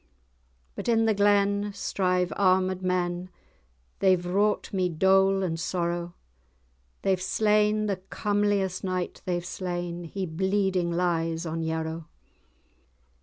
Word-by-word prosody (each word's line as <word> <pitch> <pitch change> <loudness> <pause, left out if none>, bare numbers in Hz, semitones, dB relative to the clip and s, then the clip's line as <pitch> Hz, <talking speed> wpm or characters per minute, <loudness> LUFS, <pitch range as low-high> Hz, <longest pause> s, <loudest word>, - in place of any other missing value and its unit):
"But - - -6
in 225 -1 +3
the 220 - +3
glen 205 0 +2
strive 180 -2 0
armed 185 -1 +2
men; 180 -1 -1 0.7
They've 185 -2 +3
wrought 205 +5 0
me 185 -2 +1
dole 190 +3 +3
and 165 -3 -2
sorrow; 175 0 -2 0.9
They've 190 -1 +1
slain—the 210 0 +2
comeliest 205 -3 0
knight 185 -1 -3
they've 175 -1 -2
slain, 175 -1 -4
He 190 +3 -4
bleeding 190 +1 0
lies 170 -1 0
on 165 0 -3
Yarrow." 160 0 -3
185 Hz, 110 wpm, -27 LUFS, 175-200 Hz, 0.9 s, in